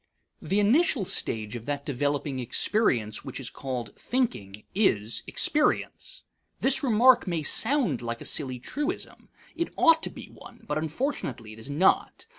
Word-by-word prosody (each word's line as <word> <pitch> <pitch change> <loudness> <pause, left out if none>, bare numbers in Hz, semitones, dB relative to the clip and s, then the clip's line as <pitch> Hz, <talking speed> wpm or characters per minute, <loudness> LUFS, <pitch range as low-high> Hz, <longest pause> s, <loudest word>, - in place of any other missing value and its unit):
The 195 - 0
initial 240 - +3
stage 110 - -1
of 120 +1 -8
that 145 -1 -3
developing 145 0 -1
experience 120 - 0
which - - -7
is - - -4
called 130 -3 -5
thinking 105 - -2
is 115 - +1
experience. 300 0 0 0.4
This 270 0 +2
remark 245 -2 +5
may 170 -3 -1
sound 225 - +2
like 115 0 -4
a - - -7
silly 130 -4 -1
truism. 295 - -5 0.3
It 335 +1 -2
ought 325 -1 +5
to - - -3
be - - -11
one; - - -14
but 150 +1 -1
unfortunately 155 - -3
it 110 - -13
is 110 - -7
not. 170 - +1
150 Hz, 150 wpm, -27 LUFS, -, 0.4 s, remark